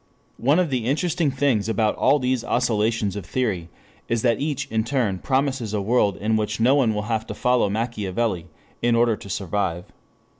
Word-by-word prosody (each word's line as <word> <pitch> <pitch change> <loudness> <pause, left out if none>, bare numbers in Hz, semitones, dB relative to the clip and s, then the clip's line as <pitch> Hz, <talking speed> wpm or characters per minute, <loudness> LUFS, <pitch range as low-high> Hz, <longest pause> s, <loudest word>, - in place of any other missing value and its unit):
One 140 +6 +3
of 180 -5 +1
the 125 -4 -1
interesting 160 +3 +1
things 130 -6 +1
about 110 -1 +1
all 140 +3 +3
these 130 -3 0
oscillations 110 -4 0
of 100 - -5
theory 95 -4 -2 0.4
is 115 -1 -1
that 120 -1 +2
each 145 -2 -1
in 110 0 +1
turn 115 -7 -1
promises 130 -4 -1
a - - 0
world 105 -3 +2
in 110 +1 0
which 105 +1 -2
no 120 +4 +4
one 125 -7 +2
will 105 - -2
have 110 0 -2
to - - -6
follow 125 -4 +2
Machiavelli 105 -3 -2 0.3
in 120 0 +3
order 115 -1 +3
to 100 - -12
survive. 95 -2 -2
115 Hz, 185 wpm, -23 LUFS, 105-130 Hz, 0.4 s, no